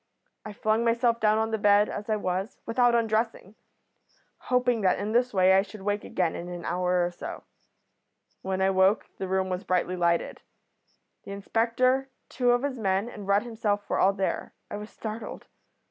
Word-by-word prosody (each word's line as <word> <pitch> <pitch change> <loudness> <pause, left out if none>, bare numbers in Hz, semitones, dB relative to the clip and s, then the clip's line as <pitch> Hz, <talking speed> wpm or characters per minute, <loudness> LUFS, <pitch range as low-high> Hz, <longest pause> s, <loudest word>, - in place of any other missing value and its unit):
I 215 - -7
flung 215 +2 0
myself 235 0 +2
down 215 0 +3
on 220 0 0
the 220 - -1
bed 205 0 +5
as 210 +1 -6
I 215 - +2
was, 190 0 -3
without 240 +1 +3
undressing, 225 -3 -1 0.9
hoping 250 -2 +1
that 185 -2 +3
in 205 +2 -3
this 245 +2 +2
way 190 -1 +4
I 190 - +6
should 205 0 -10
wake 205 +1 -1
again 175 -3 -1
in 175 - -6
an 175 -1 -7
hour 180 0 +1
or 175 - -3
so. 175 - -8 1.0
"When 190 0 -1
I 190 - +3
woke 190 +2 +3
the 190 - -3
room 190 0 0
was 185 +1 -3
brightly 185 0 0
lighted. 170 -1 0 0.8
The 200 - -7
inspector, 245 +6 +1 0.2
two 250 -1 0
of 245 +1 +3
his 270 -3 -2
men, 195 +2 0
and 205 -4 -9
Rudd 200 +2 +3
himself 215 -3 -2
were - - -1
all 195 - +4
there. 195 -1 -3 0.2
I - - -3
was 210 +1 -8
startled. 220 +1 -7
205 Hz, 185 wpm, -27 LUFS, 190-230 Hz, 1.0 s, I